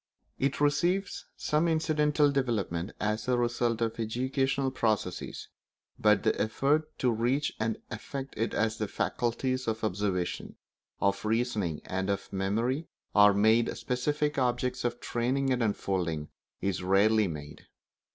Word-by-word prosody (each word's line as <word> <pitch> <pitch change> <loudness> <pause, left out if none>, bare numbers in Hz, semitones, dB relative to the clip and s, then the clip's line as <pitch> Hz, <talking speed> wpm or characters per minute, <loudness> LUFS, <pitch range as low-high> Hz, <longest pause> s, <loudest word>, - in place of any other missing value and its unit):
It 135 +1 0
receives 175 +7 +1
some 155 +3 +1
incidental 150 -2 +2
development 110 -9 -1
as 105 +1 -1
a 125 -1 +2
result 120 -1 0
of 115 0 -1
educational 130 +4 0
processes, 110 -7 -2 0.5
but - - +4
the - - +1
effort 145 +8 +1
to 125 - +2
reach 120 +6 0
and 110 0 0
affect 135 +5 -6
it 115 - -1
as 110 +1 0
the 105 - -1
faculties 130 +4 -1
of 110 0 -2
observation, 95 -3 -2 0.4
of 100 0 +1
reasoning, 110 -7 0
and 95 +1 -2
of 100 0 -3
memory 115 - 0 0.3
are 105 0 +7
made 110 +3 +3
specific 145 +3 -1
objects 125 0 0
of 120 0 -1
training 130 +3 0
and 125 - -1
unfolding, 90 -8 -1 0.3
is 95 -2 -1
rarely 100 +3 +4
made. 75 -3 -8
115 Hz, 130 wpm, -29 LUFS, 105-135 Hz, 0.5 s, are